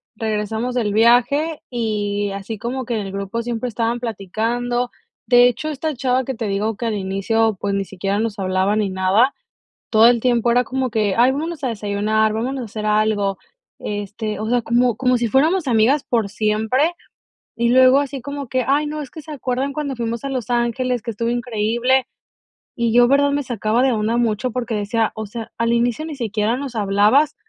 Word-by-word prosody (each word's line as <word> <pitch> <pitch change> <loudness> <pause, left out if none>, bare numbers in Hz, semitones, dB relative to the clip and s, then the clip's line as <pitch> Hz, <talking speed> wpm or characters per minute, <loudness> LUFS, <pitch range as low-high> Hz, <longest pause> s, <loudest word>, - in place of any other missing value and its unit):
regresamos 220 +2 -2
del 225 -5 0
viaje, 245 +8 +3
y 205 -4 -2
así 200 +3 -6
como 250 +4 -4
que 235 - -2
en 210 -2 -2
el 195 - -6
grupo 200 +4 -4
siempre 240 +1 -3
estaban 230 +1 -1
platicando. 240 +3 -2 0.4
De 245 0 +7
hecho, 250 +6 -2
esta 305 +1 -3
chava 255 +1 +1
que 265 - -3
te 225 -2 -4
digo 205 +2 -1
que 235 - -3
al 215 - -1
inicio, 200 +2 0
pues 200 -1 -1
ni 195 -1 -1
siquiera 195 +2 -3
nos 220 -2 -2
hablaba 190 +2 +1
ni 210 -2 0
nada, 190 +8 +2 0.5
todo 225 +1 +6
el 240 -2 +3
tiempo 240 -1 +2
era 245 +1 +3
como 260 -1 -2
que: 210 -3 +1
"Ay, 245 +2 +5
vámonos 315 +3 -4
a 260 - 0
desayunar, 215 0 0
vámonos 250 +4 -2
a - - -4
hacer 215 0 -5
algo". 210 -2 +1 0.4
Este, 210 +1 -4
o 220 - -3
sea, 245 -1 +2
como 240 -1 +2
como 255 -1 +2
si 235 -1 0
fuéramos 305 - +2
amigas 240 +5 +3
por 225 -4 0
siempre, 220 - +1 0.6
y 235 0 +1
luego 260 +2 +6
así 280 -2 -3
como 280 0 -5
que: 255 +1 -1
"Ay, 295 +2 +2
no, 300 0 -4
es 275 - -9
que 315 - -9
se 305 +1 -10
acuerdan 265 0 -2
cuando 280 -3 -3
fuimos 230 -1 -3
a - - -2
Los 255 -3 -3
Ángeles, 240 0 0
que 235 - -4
estuvo 230 +2 -3
increíble". 240 +2 +1 0.7
Y 235 -1 0
yo 245 0 +6
verdad 285 +1 +4
me 285 0 0
sacaba 235 0 0
de 265 - +3
onda 220 +1 0
mucho 240 +1 0
porque 240 -2 -3
decía, 215 +2 0
o 220 0 -4
sea, 225 +2 -7
al 230 0 +1
inicio 240 +6 0
ni 310 -3 -6
siquiera 225 -1 -1
nos 270 -2 -5
hablabas, 210 +9 +3
235 Hz, 200 wpm, -20 LUFS, 215-255 Hz, 0.7 s, De